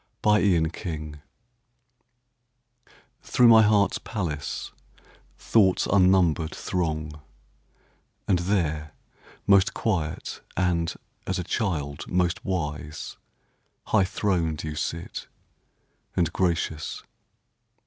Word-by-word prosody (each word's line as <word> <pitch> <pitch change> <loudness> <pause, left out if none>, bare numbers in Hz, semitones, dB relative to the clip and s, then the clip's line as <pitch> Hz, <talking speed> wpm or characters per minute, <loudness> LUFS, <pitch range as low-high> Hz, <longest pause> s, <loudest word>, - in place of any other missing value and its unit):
Day 105 -3 +4
and 80 0 0
Night 75 -4 -5 2.0
Through 125 - +4
my 115 -1 +8
heart's 105 -1 +3
palace 75 -9 -4 0.7
Thoughts 95 -5 +3
unnumbered 90 -4 +3
throng; 75 -4 -3 1.1
And 95 -3 +3
there, 80 -5 -1 0.5
most 100 0 +4
quiet 85 -9 -2 0.2
and, 85 -2 +1 0.3
as 95 - -1
a 90 - -2
child, 80 -8 -2
most 90 -1 0
wise, 75 -5 -4 0.7
High 110 -3 +4
throned 85 -5 -1
you 80 -1 -4
sit, 85 +3 -4 0.9
and 85 -3 +1
gracious. 85 -4 -1
85 Hz, 85 wpm, -26 LUFS, 75-95 Hz, 2.0 s, my